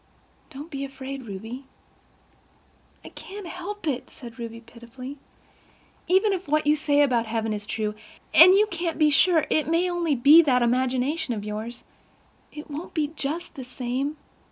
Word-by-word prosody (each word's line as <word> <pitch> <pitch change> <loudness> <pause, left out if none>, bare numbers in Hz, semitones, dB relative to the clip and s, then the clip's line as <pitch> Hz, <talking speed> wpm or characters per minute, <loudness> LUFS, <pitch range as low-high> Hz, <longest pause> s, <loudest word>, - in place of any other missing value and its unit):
Don't 290 +5 -10
be 275 -1 -4
afraid, 270 -1 -7
Ruby." 225 +7 -7 1.4
"I - - -8
can't 400 0 -10
help 360 +3 -7
it," 270 -5 -2
said 240 0 -12
Ruby 230 -1 -6
pitifully. 240 +4 -11 0.9
"Even 385 +4 +3
if 370 -3 -4
what 305 +1 +1
you 300 +1 +4
say 290 -1 +2
about 240 -5 +1
heaven 220 -1 -1
is 205 0 -6
true—and 220 - +3
you 415 +2 +5
can't 340 -1 -3
be 305 -1 +4
sure—it 315 -1 +3
may 330 +2 +2
be 365 - 0
only 315 -3 +5
that 255 -6 +2
imagination 255 +3 0
of 205 -1 -6
yours—it 230 +7 -10
won't 305 +3 -7
be 300 -3 0
just 310 +5 -4
the 265 - -8
same. 255 +4 -3
275 Hz, 150 wpm, -25 LUFS, 240-325 Hz, 1.4 s, you